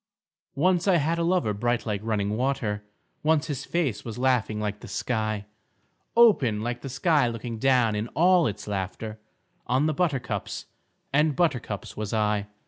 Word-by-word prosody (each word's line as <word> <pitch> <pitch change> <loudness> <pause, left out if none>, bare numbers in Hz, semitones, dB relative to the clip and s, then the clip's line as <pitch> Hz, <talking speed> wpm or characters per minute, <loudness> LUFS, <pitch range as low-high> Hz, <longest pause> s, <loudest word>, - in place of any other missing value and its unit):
Once 180 +5 +2
I 190 - +5
had 165 +1 +1
a - - +1
lover 170 - +1
bright 120 +3 0
like 105 -3 -2
running 105 -2 0
water, 115 -5 -1 0.4
Once 155 0 +2
his 145 -5 -4
face 140 -12 -1
was 115 -1 -6
laughing 125 -4 +1
like 105 -1 -3
the - - -10
sky; 110 -3 -2 0.7
Open 140 - +5
like 120 +2 -3
the 135 - -6
sky 135 +1 +2
looking 115 -1 -5
down 125 -3 +3
in 105 +2 -2
all 175 +1 +5
its 105 -1 -5
laughter 105 +2 -4 0.5
On 130 +4 +2
the 155 - +1
buttercups 130 - -2 0.5
and 150 0 +3
buttercups 125 - -1
was 105 +1 -3
I. 105 -1 +1
120 Hz, 160 wpm, -26 LUFS, 105-150 Hz, 0.7 s, I